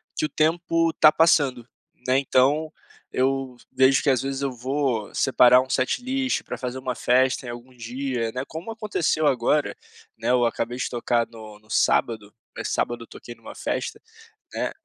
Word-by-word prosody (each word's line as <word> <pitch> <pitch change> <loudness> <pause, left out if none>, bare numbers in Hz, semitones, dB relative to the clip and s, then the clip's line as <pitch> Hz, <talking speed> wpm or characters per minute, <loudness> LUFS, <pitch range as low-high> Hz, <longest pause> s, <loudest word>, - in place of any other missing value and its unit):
que - - 0
o - - -3
tempo 165 +1 +1
está 155 - +6
passando, 140 -7 +2 0.4
né, 130 +1 +3
então 140 +4 +2 0.4
eu 135 0 -1 0.2
vejo 130 +1 +3
que - - +2
às 130 -3 +2
vezes 135 0 -3
eu 140 -1 -1
vou 125 -3 -2
separar 125 -1 +5
um 130 - -8
setlist 260 - -1
para - - -6
fazer 125 0 -5
uma 130 -1 -4
festa 130 +1 +2
em - - -6
algum 120 +2 -9
dia, 120 0 -3
né, 130 - -3
como 170 +8 -7
aconteceu 210 -8 -1
agora, 140 +2 +1 0.4
né, - - -3
eu 125 -1 +3
acabei 120 +1 -2
de 125 - -2
tocar 120 -1 0
no 110 -2 -12
no 110 0 -27
sábado, 110 -3 +1 0.2
eh, - - -4
sábado 120 0 -2
eu - - -15
toquei 120 - -11
numa 115 - -12
festa, - - -4 0.5
né, - - -2
130 Hz, 175 wpm, -24 LUFS, 120-145 Hz, 0.5 s, está